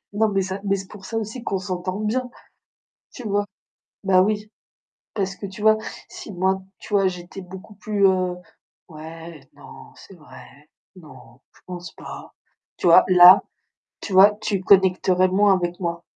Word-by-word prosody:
Non, 220 +1 +2
mais 195 -1 0
ça 190 +1 -5
mais 195 -1 +1
c'est 195 0 -7
pour 200 -2 -13
ça 225 - -4
aussi 225 +2 -5
qu'on 195 - -2
s'entend 185 0 -5
bien. 245 +4 -2 0.8
Tu 245 -4 -8
vois? 205 0 0 0.6
Bah 190 -2 +4
oui. 210 +2 -1 0.6
Parce 195 -3 -3
que 200 - -8
tu 195 +1 -9
vois, 215 0 +4 0.3
si - - -10
moi, 190 +1 -1 0.2
tu - - -11
vois, 195 -1 +3
j'étais 180 +1 -9
beaucoup 190 +3 -12
plus, 205 -1 0
heu, 185 -1 0 0.5
«Ouais, 160 0 -11
non, 145 -2 -15
c'est 195 - -15
vrai, 155 -4 -15 0.5
non, 140 -8 -16
je - - -23
pense 175 -2 -8
pas», - - -11 0.4
tu - - -1
vois, 170 - +7
là, 180 0 +8 0.6
tu 200 - -7
vois, 195 +2 +8
tu 200 -3 -2
connecterais 185 -1 +3
moins 200 +2 +3
avec 175 -1 -3
moi. 170 -2 -4
190 Hz, 165 wpm, -22 LUFS, 180-205 Hz, 0.8 s, là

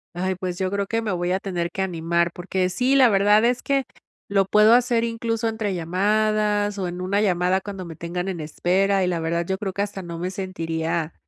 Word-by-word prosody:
Ay, 185 +2 -1
pues, 180 -1 -4
yo 190 -1 -1
creo 200 -1 -1
que 230 +1 -1
me 210 - -2
voy 175 0 -1
a 190 - 0
tener 175 -3 -3
que 190 +2 -2
animar, 170 -1 0
porque 185 +1 -1
sí, 255 +8 +1
la 255 -3 +6
verdad 205 +2 +4
es 245 +1 +1
que 275 -1 +1 0.4
lo 195 -1 +2
puedo 210 +3 +5
hacer, 240 -1 +3
incluso, 230 0 -2
entre 220 -3 -2
llamadas, 205 +3 +1
o 185 - -1
en 175 +1 -6
una 200 +3 0
llamada 185 -1 +1
cuando 195 -3 -7
me 165 -2 -8
tengan 175 +3 -4
en 185 -3 -3
espera, 190 +5 +1
y 180 - +1
la 175 -2 -1
verdad 170 +1 -1
yo 190 +1 -2
creo 195 -3 -3
que 200 +2 -1
hasta 200 -1 -5
no 170 -2 -7
me 180 +2 -3
sentiría 165 -4 -3
190 Hz, 225 wpm, -23 LUFS, 175-210 Hz, 0.4 s, la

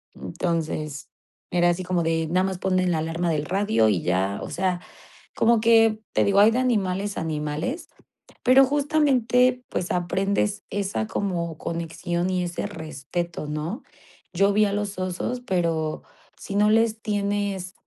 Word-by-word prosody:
Entonces, 155 - -3 0.4
era 175 0 +3
así 175 +2 -1
como 180 -1 0
de 165 0 0
nada 180 +3 +2
más 190 -1 -2
ponen 185 -1 +1
la 165 - +1
alarma 165 +2 -1
del 150 -2 0
radio 195 - +2
y 95 -5 +1
ya, 95 +2 0
o - - -6
sea, 180 -1 -1 0.5
como 230 0 +3
que 225 -1 +4
te - - +2
digo, 200 0 +4
hay 210 +2 +7
de 230 - 0
animales 205 -5 0
a - - -2
animales, 155 - -3 0.6
pero 255 +2 +7
justamente, 260 -3 +2
pues, 175 - -3
aprendes 195 +3 0
esa 195 - -2
como 170 - -2
conexión 170 +2 -3
y 185 -1 0
ese 175 +3 -3
respeto, 160 -1 -5
¿no? 155 - -4 0.5
Yo 195 +3 +3
vi 210 +1 +4
a 200 - -1
los 205 -1 -3
osos 185 +7 -3
pero 165 -5 -1 0.4
si 200 - -6
no 210 +1 +4
les 225 0 +2
tienes, 200 -3 -2
185 Hz, 155 wpm, -24 LUFS, 165-210 Hz, 0.6 s, hay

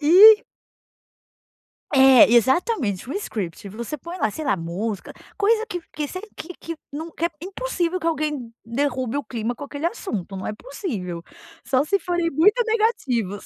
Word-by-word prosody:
E 410 +9 +9 1.5
É, 265 -4 +7
exatamente. 245 - +2
Um 275 - -3
script. 210 - -4
Você 235 +8 -5
põe 340 +5 -7
lá, 220 - +1
sei 310 - -6
lá, 200 - +2
música 185 +5 -4 0.2
coisa 435 +2 +2
que 360 -5 -4
que 300 -1 -3
se 370 - -6 0.2
que 360 - -8
que 330 0 -6 0.2
não 320 +3 -5
que 330 - -4
é - - -2
impossível 370 -3 -2
que 330 - -3
alguém 300 -7 -1
derrube 255 +1 -1
o 285 - -2
clima 235 0 -3
com 285 - -8
aquele 285 +3 -3
assunto. 210 - -4
Não 190 - -5
é - - -2
possível. 205 - -5 0.4
Só 265 0 +2
se 395 +6 +1
forem 345 -2 -1
muito 410 - +4
negativos. 270 - 0
290 Hz, 165 wpm, -23 LUFS, 230-360 Hz, 1.5 s, E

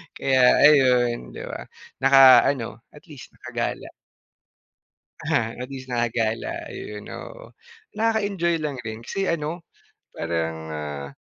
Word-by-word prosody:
Kaya, 130 -2 +4
ayun, 125 -5 +4
di - - -7
ba, - - -8 0.3
na 135 - +4 0.4
ano, 115 -5 -2
at 150 - -15
least 150 -7 -12
nakagala. - - -4 1.4
Aha, 115 -1 +1
at 125 - -5
least 130 -2 -9
nakagala. 115 -2 -2
Ayun, 105 0 -8
oo. - - -10 0.4
Nakaka-enjoy 205 -6 0
lang 145 -4 -4
rin 115 -1 -7
kasi 195 +8 -3
ano, 165 +1 -3 0.4
parang, 80 -1 -3 0.2
ah, 75 -2 -5
125 Hz, 120 wpm, -23 LUFS, 110-150 Hz, 1.4 s, Kaya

